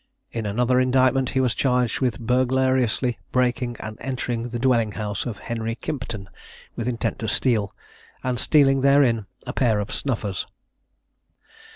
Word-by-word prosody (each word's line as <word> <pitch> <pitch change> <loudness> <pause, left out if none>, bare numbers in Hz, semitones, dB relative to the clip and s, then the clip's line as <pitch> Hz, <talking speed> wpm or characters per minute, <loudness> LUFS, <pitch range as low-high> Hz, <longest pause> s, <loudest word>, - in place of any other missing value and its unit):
In 115 -2 -3
another 125 +4 +2
indictment 130 0 +3
he 130 - 0
was 125 -3 +2
charged 125 -3 +1
with 125 -5 0
burglariously 130 0 +1
breaking 125 -1 0
and 110 0 -7
entering 120 -2 -3
the 120 - -3
dwelling 115 -4 +2
house 105 +1 -3
of 110 -4 -4
Henry 115 0 -3
Kimpton, 115 -9 -5 0.5
with 115 - -3
intent 120 -2 -2
to 110 - -3
steal, 110 -2 +1 0.5
and 125 -2 -1
stealing 135 -1 +4
therein 130 -6 +4 0.2
a - - -4
pair 115 -6 +2
of 105 - -4
snuffers. 110 -8 -2
125 Hz, 145 wpm, -23 LUFS, 115-130 Hz, 0.5 s, stealing